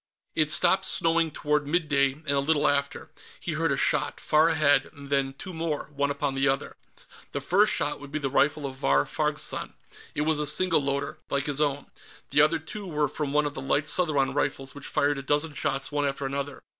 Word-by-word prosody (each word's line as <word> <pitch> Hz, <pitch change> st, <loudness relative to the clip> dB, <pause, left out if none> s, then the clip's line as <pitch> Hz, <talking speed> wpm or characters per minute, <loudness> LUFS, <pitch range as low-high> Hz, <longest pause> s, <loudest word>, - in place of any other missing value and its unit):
It 155 Hz, -1 st, +1 dB
stopped 190 Hz, +5 st, +4 dB
snowing 165 Hz, -2 st, +1 dB
toward 150 Hz, -1 st, -1 dB
mid 165 Hz, +1 st, 0 dB
day, 140 Hz, -2 st, +3 dB
and 150 Hz, 0 st, -4 dB
a 140 Hz, -, +2 dB
little 145 Hz, +2 st, +2 dB
after, 140 Hz, 0 st, -1 dB, 0.3 s
he -, -, -4 dB
heard -, -, 0 dB
a -, -, +1 dB
shot, -, -, +1 dB
far 155 Hz, +2 st, +3 dB
ahead, 155 Hz, -3 st, +3 dB
and 140 Hz, -1 st, -12 dB
then 135 Hz, -1 st, +1 dB
two 185 Hz, +7 st, -8 dB
more, 160 Hz, -2 st, -3 dB
one 140 Hz, 0 st, 0 dB
upon 140 Hz, 0 st, -1 dB
the 135 Hz, +1 st, +1 dB
other. 135 Hz, 0 st, -1 dB, 0.6 s
The -, -, -1 dB
first 205 Hz, +4 st, +3 dB
shot 145 Hz, -, -1 dB
would 145 Hz, -1 st, -11 dB
be 155 Hz, -, -1 dB
the 145 Hz, -2 st, -2 dB
rifle 145 Hz, +1 st, +2 dB
of 135 Hz, -1 st, -6 dB
Vahr 70 Hz, -, +2 dB
Farg's -, -, -1 dB
son; -, -, -5 dB, 0.4 s
it -, -, 0 dB
was 155 Hz, 0 st, +1 dB
a 150 Hz, -, 0 dB
single 165 Hz, +2 st, +3 dB
loader, 140 Hz, 0 st, -2 dB
like 140 Hz, -1 st, -1 dB
his 145 Hz, 0 st, -1 dB
own. 145 Hz, -1 st, 0 dB, 0.5 s
The 150 Hz, -, +5 dB
other 155 Hz, +2 st, +4 dB
two 195 Hz, +5 st, -8 dB
were 150 Hz, -3 st, 0 dB
from 150 Hz, -2 st, -4 dB
one 150 Hz, +1 st, +2 dB
of 145 Hz, -, -2 dB
the 135 Hz, -, -6 dB
light 140 Hz, +2 st, 0 dB
Southron 145 Hz, -6 st, +1 dB
rifles, 140 Hz, -1 st, -2 dB
which 145 Hz, -1 st, -9 dB
fired 145 Hz, 0 st, +1 dB
a -, -, -5 dB
dozen 145 Hz, +3 st, 0 dB
shots 135 Hz, 0 st, -2 dB
one 145 Hz, -1 st, 0 dB
after 140 Hz, 0 st, -3 dB
another. 140 Hz, +1 st, -4 dB
145 Hz, 220 wpm, -26 LUFS, 140-155 Hz, 0.6 s, The